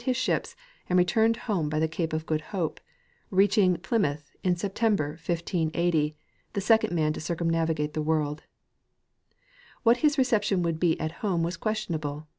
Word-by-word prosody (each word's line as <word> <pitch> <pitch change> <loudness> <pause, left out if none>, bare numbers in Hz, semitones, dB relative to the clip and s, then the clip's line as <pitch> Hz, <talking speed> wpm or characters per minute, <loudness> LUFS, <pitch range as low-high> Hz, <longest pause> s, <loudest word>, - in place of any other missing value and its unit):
his 255 -2 0
ships, 255 - -1 0.3
and 180 - +3
returned 220 +6 +3
home 180 -9 0
by 155 - -2
the 160 +1 +2
cape 160 +1 -3
of 160 0 -2
Good 155 -1 -1
Hope, 180 -7 -2 0.5
reach 195 +1 +3
ing 185 -5 +4
Plymouth 155 -7 -1
in 180 -2 +2
September, 200 -3 0
1580, 165 -1 -1 0.4
the 200 - -1
second 220 0 +3
man 155 -3 +1
to - - -6
cil 170 +2 -2
cumnavi 165 -1 0
gate 150 0 -2
the 155 - -1
work! 155 0 +1
(figure 150 +2 -6
2*). - - -30 1.4
What 235 +1 +5
his 295 +2 +2
reception 210 -8 +2
would 165 -2 -1
be 170 -2 +2
at 155 0 -2
home 180 -6 0
was 170 +2 -1
questionable. 160 -9 -3
170 Hz, 180 wpm, -27 LUFS, 155-205 Hz, 1.4 s, What